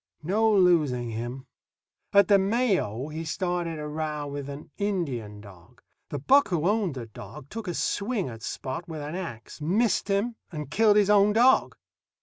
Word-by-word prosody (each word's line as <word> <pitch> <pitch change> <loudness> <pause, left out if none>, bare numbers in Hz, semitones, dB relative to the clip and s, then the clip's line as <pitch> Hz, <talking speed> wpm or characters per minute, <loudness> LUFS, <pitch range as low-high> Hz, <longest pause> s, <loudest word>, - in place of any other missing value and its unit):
No 215 +7 +2
losing 155 - +3
him. 120 +4 -5 0.7
At 200 -2 +6
the 200 -1 +6
Mayo 190 - 0
he 160 +2 -5
started 175 0 -2
a 150 0 -5
row 150 -1 -3
with 140 -1 -6
an 140 +1 -9
Indian 135 - -2
dog. 100 +4 -16 0.3
The 145 - -3
buck 275 - +4
who 170 -2 0
owned 205 -7 +1
the 125 -3 -5
dog 115 +6 -11
took 225 -1 -6
a 175 - -2
swing 205 -2 -1
at 115 -3 -8
Spot 135 +9 -5
with 160 -2 -6
an 145 +2 -5
ax, 165 -8 -7
missed 200 +9 +1
him, 210 +4 0
and 150 -4 -6
killed 210 +2 +4
his 205 -1 +4
own 205 0 +5
dog. 245 +4 +4
165 Hz, 170 wpm, -26 LUFS, 135-200 Hz, 0.7 s, At